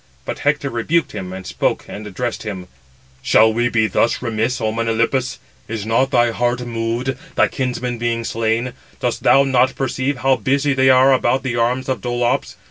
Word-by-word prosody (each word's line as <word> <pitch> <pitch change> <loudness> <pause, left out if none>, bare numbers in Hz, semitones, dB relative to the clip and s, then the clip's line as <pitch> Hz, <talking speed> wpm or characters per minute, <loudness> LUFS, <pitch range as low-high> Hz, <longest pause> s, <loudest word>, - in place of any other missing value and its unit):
But - - -4
Hector - - 0
rebuked 145 +7 0
him; 90 -1 -6
and 95 0 -7
spoke - - -1
and 105 0 -8
addressed 120 +4 -4
him: 95 -4 -6 0.5
"Shall 110 0 +4
we 120 +2 +1
be 110 -2 +2
thus 110 +3 +1
remiss, 115 +1 -1
O 110 -2 0
Melanippus? 115 +3 0 0.3
Is 110 -1 -4
not 115 +4 +2
thy 120 -3 +3
heart 120 +2 0
moved, 120 +2 -2 0.2
thy - - +4
kinsman 125 -2 -3
being 115 0 -1
slain? 115 +2 -1 0.3
Dost - - -2
thou 135 - +5
not 130 -1 +2
perceive 135 +1 -1
how 135 +1 +2
busy 140 +6 +1
they 130 0 +3
are 130 +1 +6
about 130 +1 +1
the 125 -3 -2
arms 125 +2 0
of 130 -6 -2
Dolops? 120 +2 -1
120 Hz, 180 wpm, -19 LUFS, 115-130 Hz, 0.5 s, are